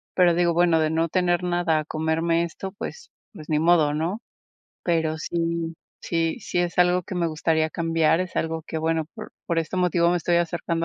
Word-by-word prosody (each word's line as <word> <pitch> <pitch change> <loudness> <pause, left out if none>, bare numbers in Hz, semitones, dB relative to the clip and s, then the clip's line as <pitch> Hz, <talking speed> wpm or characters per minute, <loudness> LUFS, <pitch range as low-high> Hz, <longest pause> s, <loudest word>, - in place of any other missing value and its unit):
Pero 180 -2 +5
digo, 170 0 +2
bueno, 170 -1 +3
de 155 - +2
no 165 +1 +1
tener 175 +1 +1
nada 175 -3 +1
a 155 - -4
comerme 160 +2 0
esto, 190 +3 -6
pues 470 - -8 0.2
pues, 155 -6 -11
ni 155 -1 +1
modo, 160 -3 +4
¿no? 170 +9 -2 0.6
Pero 160 -2 0
sí 165 +1 -2 0.3
sí 165 -1 -1
sí 175 - -3
es 175 -1 -1
algo 180 0 +4
que 185 - -7
me 175 -1 0
gustaría 160 0 0
cambiar, 165 0 +1
es 185 -1 -5
algo 160 0 -1
que, - - -5
bueno, 160 0 0
por 215 - -9
por 170 -2 0
este 165 +3 -2
motivo 175 -1 +3
me 175 - +2
estoy 170 +1 +1
acercando 170 -1 -1
170 Hz, 200 wpm, -24 LUFS, 160-175 Hz, 0.6 s, Pero